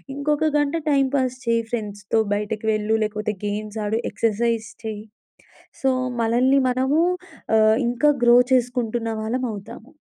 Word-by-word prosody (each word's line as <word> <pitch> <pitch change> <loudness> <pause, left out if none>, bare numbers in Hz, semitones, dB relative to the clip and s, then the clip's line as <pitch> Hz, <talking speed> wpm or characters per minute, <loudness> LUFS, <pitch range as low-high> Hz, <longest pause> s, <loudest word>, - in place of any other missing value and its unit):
ఇంకొక 300 +2 0
గంట 290 +1 0
time 275 -1 +3
pass 255 -1 -1
చెయి. 230 0 +2
ఫ్రెండ్స్‌తో 210 -2 -2 0.2
బయటకు 210 +1 -4
వెళ్ళు. 215 +1 0
లేకపోతే 210 0 -2
గేమ్స్ 210 +1 -4
ఆడు. 220 +2 0
ఎక్సర్‌సైజ్ 230 0 0 0.2
చెయి. 215 -1 -5 0.8
సో, 265 - +2 0.3
మలల్ని 245 +4 +3
మనము 260 +4 +1 0.6
ఆహ్, 220 0 +5
ఇంకా 245 +5 +2
గ్రో 240 0 +7 0.2
చేసుకుంటున్న 240 -2 0
వాళ్ళమవుతాము. 225 +1 -5
230 Hz, 125 wpm, -22 LUFS, 215-255 Hz, 0.8 s, గ్రో